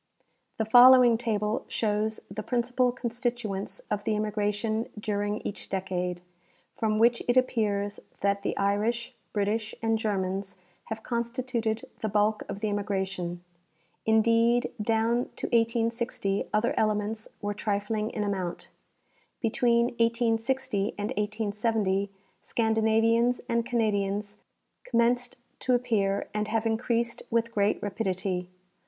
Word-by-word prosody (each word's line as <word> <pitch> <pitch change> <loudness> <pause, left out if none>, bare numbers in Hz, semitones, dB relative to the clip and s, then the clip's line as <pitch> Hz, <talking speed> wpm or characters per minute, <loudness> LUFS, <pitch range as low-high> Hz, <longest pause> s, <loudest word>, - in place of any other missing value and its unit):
The 220 - 0
following 245 +1 +8
table 220 -1 -1
shows 215 0 0
the 215 - -5
principal 245 +2 +1
constituents 240 -4 -3
of 205 -1 -1
the 215 - 0
immigration 210 +1 -1
during 205 0 -1
each 200 - -6
decade, 180 -2 -2 0.5
from 215 -1 0
which 235 +2 +4
it 245 +1 +3
appears 205 -5 +1 0.2
that 200 0 +1
the - - -2
Irish, 210 +4 0 0.2
British 215 +2 -1
and 225 -1 +1
Germans 195 -2 -2 0.3
have 220 0 -6
constituted 235 -2 -2
the 220 - -2
bulk 210 +1 +2
of 200 - -5
the 215 - 0
immigration. 190 -4 -2 0.6
Indeed, 230 +2 +3
down 225 +3 +1
to - - -4
1860 230 -3 0
other 215 +3 +2
elements 215 0 0
were 205 0 -2
trifling 210 +1 -1
in 215 - -3
amount. 190 -4 -3 0.7
Between 235 +1 +2
1860 230 -2 +1
and 205 +1 -2
1870 210 -1 0 0.3
Scandinavians 225 +2 +2
and 235 -1 +1
Canadians 205 -3 0 0.5
commenced 245 +1 +1 0.2
to 255 -1 +2
appear 215 -5 0
and 210 0 -1
have 225 +1 0
increased 235 +1 0
with 230 0 0
great 205 -1 +2
rapidity. 185 -3 -2
220 Hz, 115 wpm, -28 LUFS, 205-235 Hz, 0.7 s, following